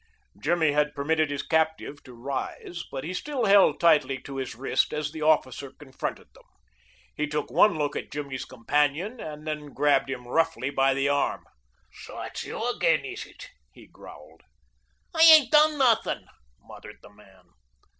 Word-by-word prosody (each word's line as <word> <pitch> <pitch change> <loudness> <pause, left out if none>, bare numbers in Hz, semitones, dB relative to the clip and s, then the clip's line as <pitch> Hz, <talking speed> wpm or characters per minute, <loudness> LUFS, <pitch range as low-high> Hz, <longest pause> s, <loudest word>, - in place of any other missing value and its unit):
Jimmy 160 +1 +2
had 150 0 0
permitted 155 +2 0
his 145 -1 -3
captive 160 -2 -1
to 125 -3 -13
rise, 140 +7 -5
but 135 - -5
he 175 - -5
still 265 +4 -3
held 200 -1 +5
tightly 150 -5 +3
to 135 -1 -8
his 130 -4 -5
wrist 130 +4 0
as 150 -1 -3
the 160 0 -8
officer 140 -3 +1
confronted 135 -3 -7
them. - - -20 0.7
He 150 - -2
took 150 0 -4
one 205 -6 +4
look 145 -1 -2
at - - -5
Jimmy's 140 -3 -5
companion, 150 - -1
and 150 -3 -8
then 150 -2 -6
grabbed 145 -1 +2
him 125 -2 -6
roughly 160 -1 0
by 135 -1 +2
the 135 +1 0
arm. 145 0 0 0.5
"So, - - -11
it's - - -6
you - - -4
again, - - +1
is - - -7
it?" - - -13 0.2
he - - -16
growled. - - -15 0.7
"I 320 - 0
ain't 315 -4 +8
done 305 0 +5
nuthin'," 230 -4 +1 0.4
muttered - - -13
the - - -15
man. 100 -2 -21
150 Hz, 165 wpm, -26 LUFS, 135-165 Hz, 0.7 s, ain't